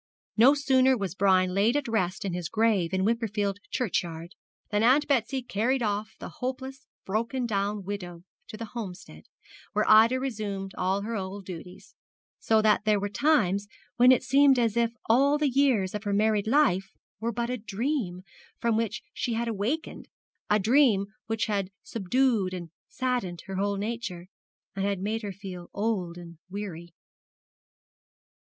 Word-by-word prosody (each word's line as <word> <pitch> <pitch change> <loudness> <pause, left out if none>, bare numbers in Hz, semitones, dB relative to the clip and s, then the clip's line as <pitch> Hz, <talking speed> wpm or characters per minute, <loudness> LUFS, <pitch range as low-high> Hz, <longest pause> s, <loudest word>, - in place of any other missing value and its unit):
No 250 +6 +6
sooner 265 -2 +3
was 195 -5 -3
Brian 185 -2 +3
laid 215 +8 +3
at 290 - -2
rest 195 -5 -1
in 190 - -2
his 175 -2 -3
grave 215 -6 +2
in 190 0 0
Wimperfield 210 -3 -1
churchyard 175 -7 -2 0.4
than 210 0 +2
Aunt 260 +6 +4
Betsy 265 -1 0
carried 245 +3 0
off 210 0 -2
the - - -8
hopeless, 260 +1 -5 0.2
broken 230 +5 -1
down 205 -2 -1
widow 180 -3 -6 0.2
to 215 - -9
the 230 - -5
Homestead, 180 - -8 0.5
where 210 +1 +1
Ida 225 +4 +6
resumed 205 -7 -4
all 190 +2 0
her 230 +2 -3
old 195 0 -5
duties; 180 0 -10 0.5
so 220 -1 +2
that 210 -1 +3
there 210 -2 +3
were 205 +1 -2
times 205 - +2 0.3
when 250 +1 +7
it 255 - +4
seemed 270 +1 +5
as 230 -3 +1
if 235 -1 +2 0.2
all 275 +6 +4
the 295 0 +1
years 250 -8 +2
of 210 0 -4
her 205 - 0
married 210 0 +2
life 195 -8 +2 0.2
were 230 +2 -1
but 235 +2 -2
a 250 - -2
dream 210 -3 -2 0.3
from 230 -1 +1
which 225 -2 -2
she 240 - -2
had 235 +1 -1
awakened, 230 +9 -3 0.4
a 210 - +4
dream 215 -2 +3
which 225 0 0
had 200 -3 -1
subdued 220 -2 0
and 170 -3 -7 0.2
saddened 245 -10 -2
her 190 -1 -5
whole 200 +1 0
nature, 205 -4 -4 0.5
and 195 - -2
had 200 -1 0
made 215 +4 -2
her 205 -2 -4
feel 185 -2 -9
old 200 -5 -1
and 170 -2 -11
weary. 185 -4 -6
210 Hz, 160 wpm, -27 LUFS, 195-240 Hz, 0.5 s, when